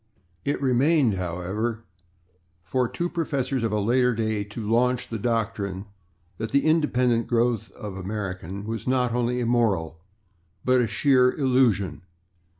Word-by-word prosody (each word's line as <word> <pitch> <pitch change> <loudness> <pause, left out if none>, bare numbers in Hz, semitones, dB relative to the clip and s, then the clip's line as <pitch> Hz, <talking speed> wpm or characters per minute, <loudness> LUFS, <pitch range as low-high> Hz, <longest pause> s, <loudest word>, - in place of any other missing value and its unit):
It 140 - -1
remained, 135 -1 +3
however, 95 +6 -3 0.8
for 125 +7 0
two 175 - -2
professors 140 -7 -2
of 115 -2 0
a 105 - +1
later 125 +3 +2
day 110 -2 -1
to 105 +1 -7
launch 125 +2 +2
the 115 - -5
doctrine 105 -4 -2 0.5
that 110 0 -3
the 140 +4 +2
independent 125 -7 +2
growth 120 -2 +1
of 105 -3 -7
American 95 -1 -5
was 115 +2 -5
not 125 -2 +1
only 125 0 0
immoral, 110 -10 +1 0.7
but 130 0 +4
a 120 - +1
sheer 125 +4 +3
illusion. 120 - +1
115 Hz, 135 wpm, -25 LUFS, 105-125 Hz, 0.8 s, but